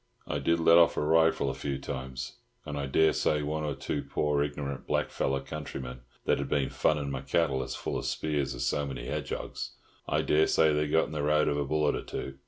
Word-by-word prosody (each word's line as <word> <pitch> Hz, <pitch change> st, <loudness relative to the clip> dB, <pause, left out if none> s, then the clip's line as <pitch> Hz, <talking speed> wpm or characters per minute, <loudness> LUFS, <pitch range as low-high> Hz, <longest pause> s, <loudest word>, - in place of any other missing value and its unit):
I 70 Hz, -, -1 dB
did 85 Hz, +4 st, +2 dB
let 85 Hz, +1 st, +7 dB
off 85 Hz, -, +4 dB
a -, -, +2 dB
rifle 80 Hz, -2 st, +3 dB
a -, -, -5 dB
few 70 Hz, +1 st, -3 dB
times, 65 Hz, -1 st, -6 dB, 0.3 s
and 75 Hz, -, -5 dB
I 70 Hz, -1 st, -2 dB
dessay 75 Hz, +1 st, +3 dB
one 75 Hz, +1 st, -2 dB
or 75 Hz, -2 st, -2 dB
two 70 Hz, +2 st, -3 dB
poor, 70 Hz, +1 st, 0 dB
ignorant 70 Hz, -1 st, -3 dB
black -, -, 0 dB
feller 70 Hz, 0 st, 0 dB
countrymen 65 Hz, -4 st, -6 dB, 0.3 s
that -, -, +2 dB
had -, -, -3 dB
been 70 Hz, -2 st, +1 dB
fun' 70 Hz, -2 st, +1 dB
my 65 Hz, -1 st, -3 dB
cattle 70 Hz, -1 st, +1 dB
as 65 Hz, 0 st, -4 dB
full -, -, -3 dB
of -, -, -6 dB
spears 70 Hz, -4 st, -1 dB
as -, -, -2 dB
so 70 Hz, 0 st, 0 dB
many 70 Hz, -, -5 dB
hedgehogs—I -, -, -4 dB
dessay 80 Hz, 0 st, +4 dB
they 75 Hz, 0 st, +1 dB
got 80 Hz, +2 st, +3 dB
in -, -, -9 dB
the 75 Hz, -2 st, -2 dB
road 75 Hz, +1 st, +3 dB
of 70 Hz, -, +1 dB
a 70 Hz, -, 0 dB
bullet 75 Hz, +1 st, +1 dB
or -, -, -3 dB
two. 65 Hz, 0 st, -6 dB
75 Hz, 215 wpm, -29 LUFS, 70-75 Hz, 0.3 s, let